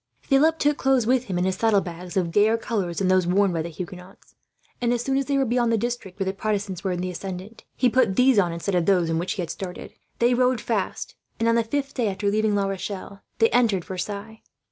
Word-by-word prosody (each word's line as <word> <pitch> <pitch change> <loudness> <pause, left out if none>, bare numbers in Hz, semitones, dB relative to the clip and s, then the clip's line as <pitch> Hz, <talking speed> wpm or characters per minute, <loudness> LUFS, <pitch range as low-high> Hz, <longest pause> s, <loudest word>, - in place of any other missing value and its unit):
Philip 310 +4 +3
took 295 -1 +1
clothes 265 -3 +2
with 255 +1 +2
him, 185 -6 -3
in 180 - +1
his 190 0 0
saddlebags, 180 -5 0
of 175 -3 0
gayer 215 +4 +4
colours 200 -7 -3
than 195 - +1
those 185 -1 +3
worn 195 +1 +3
by 165 - -1
the 170 - -4
Huguenots; 180 +3 -10 0.5
and 240 -1 +1
as 240 -1 -1
soon 270 +1 0
as 275 0 +1
they 280 -1 +1
were 270 - +2
beyond 240 -1 +1
the 225 - +3
district 225 -4 -4
where 195 - 0
the 190 - -1
Protestants 200 -3 -3
were 190 - 0
in 180 -1 -2
the 185 0 -2
ascendant, 190 +4 -7
he 255 - +3
put 240 -5 +2
these 250 -1 +5
on 175 -3 +2
instead 170 +4 -3
of 175 -2 +1
those 180 -4 +3
in 165 - 0
which 175 - -2
he 185 - -3
had 165 - -5
started. 180 -2 -7 0.2
They 240 +1 +3
rode 250 0 +2
fast 215 -3 -3 0.3
and, 230 - +1
on 230 - +4
the 230 0 +3
fifth 280 +4 -3
day 240 -4 0
after 200 +1 -1
leaving 215 0 +1
La 200 -1 +1
Rochelle, 195 0 -5 0.2
they 225 - +3
entered 220 -8 +2
Versailles. 205 +4 -6
200 Hz, 245 wpm, -24 LUFS, 185-240 Hz, 0.5 s, these